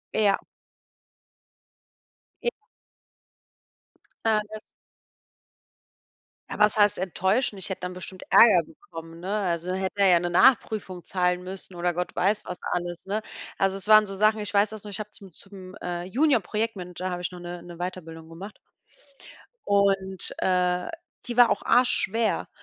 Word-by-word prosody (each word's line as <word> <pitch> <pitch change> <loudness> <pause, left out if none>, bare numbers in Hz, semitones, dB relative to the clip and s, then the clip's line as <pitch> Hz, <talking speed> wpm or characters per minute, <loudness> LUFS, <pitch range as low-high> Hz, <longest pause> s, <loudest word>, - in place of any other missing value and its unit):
Ja. 205 -2 +3 2.1
J 480 - +1 1.8
Äh, 220 -1 +3
das 215 - -7 1.9
Ah - - -4
was 210 0 +4
heißt 205 -1 +4
enttäuschend? 190 +4 0
Ich - - -5
hätte 190 - -5
dann 180 0 -4
bestimmt 185 0 -7
Ärger 200 -7 +7
bekommen, 165 +1 -12
ne? 195 +4 -2
Also, 175 -2 -2
hätte 190 +1 -2
er 195 - +6
ja 175 -2 +6
'ne 175 0 -3
Nachprüfung 200 -4 +2
zahlen 180 -1 0
müssen 190 0 -8
oder 175 0 0
Gott 180 +1 -4
weiß 205 +4 +1
was 180 - -6
alles, 175 -1 -3
ne? 210 +3 -2 0.4
Also 195 0 +1
es 195 +1 -7
waren 215 -1 +7
so 195 - -6
Sachen, 215 +2 +3
ich 210 - -4
weiß 205 0 +3
das 215 -2 -9
noch, 210 - -8
ich 205 - -5
habe 210 0 -6
zum 195 -4 -12
zum, 190 +1 -13
äh, 175 -3 -5
Junior 255 +5 +2
Projektmanager 185 -3 -4
habe 175 0 -4
ich 180 - -3
noch 180 - -10
'ne 175 0 -7
'ne 175 0 -11
Weiterbildung 165 -2 -7
gemacht 190 +6 -10 1.1
und, 195 -2 +1
äh, 180 -1 +1 0.4
die 240 - -5
war 245 -2 +7
auch - - 0
Arsch 250 0 +4
schwer 225 +2 +1
190 Hz, 155 wpm, -26 LUFS, 180-210 Hz, 2.1 s, Ärger